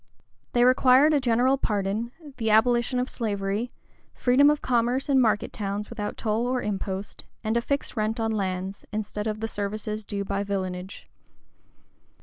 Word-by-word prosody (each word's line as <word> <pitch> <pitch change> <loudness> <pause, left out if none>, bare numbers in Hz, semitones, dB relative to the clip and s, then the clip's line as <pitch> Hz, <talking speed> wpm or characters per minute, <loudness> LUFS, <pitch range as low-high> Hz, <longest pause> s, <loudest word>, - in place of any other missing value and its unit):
They 240 - +4
required 255 +4 +5
a 290 - +4
general 255 +2 +2
pardon, 210 +2 -1 0.3
the 225 -2 0
abolition 240 +3 +3
of 250 +1 0
slavery, 205 0 -2 0.4
freedom 265 +3 +5
of 300 0 +2
commerce 245 +2 +1
in 270 -2 +4
market 215 -3 +1
towns 205 +1 -3
without 210 -3 -4
toll 225 +2 0
or 255 0 0
impost, 195 -2 -4 0.2
and 220 +1 0
a 235 - +3
fixed 280 +3 -2
rent 220 +1 -1
on 225 0 0
lands, 190 -2 -3
instead 210 0 -3
of 215 0 -3
the 225 - -1
services 215 +1 -4
due 200 -1 -4
by 200 +1 -1
villainage. 190 -2 -4
220 Hz, 155 wpm, -26 LUFS, 200-245 Hz, 0.4 s, required